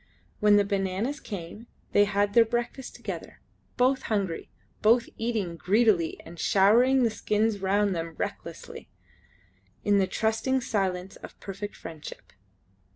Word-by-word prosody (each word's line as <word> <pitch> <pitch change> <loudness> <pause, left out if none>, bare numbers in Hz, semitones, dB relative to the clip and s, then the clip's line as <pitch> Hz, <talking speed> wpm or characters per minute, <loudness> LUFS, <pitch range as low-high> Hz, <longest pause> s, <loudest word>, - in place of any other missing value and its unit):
When 210 -1 +5
the 205 - +5
bananas 200 +8 -1
came 200 - -8 0.2
they 205 - +5
had 200 0 0
their 235 - +7
breakfast 240 +3 -4
together; - - -7 0.4
both 260 +2 +3
hungry, 195 -6 -1 0.3
both 230 +2 +4
eating 220 -7 -2
greedily 200 -3 +2
and 165 0 -11
showering 240 +9 +4
the 230 - +2
skins 215 0 0
round 195 0 +1
them 165 -1 -4
recklessly, - - -6 0.9
in 205 -1 +3
the 190 - +2
trusting 225 +6 0
silence 190 -5 -2
of - - -12
perfect 200 +1 -6
friendship. 160 -2 -10
205 Hz, 130 wpm, -27 LUFS, 190-230 Hz, 0.9 s, their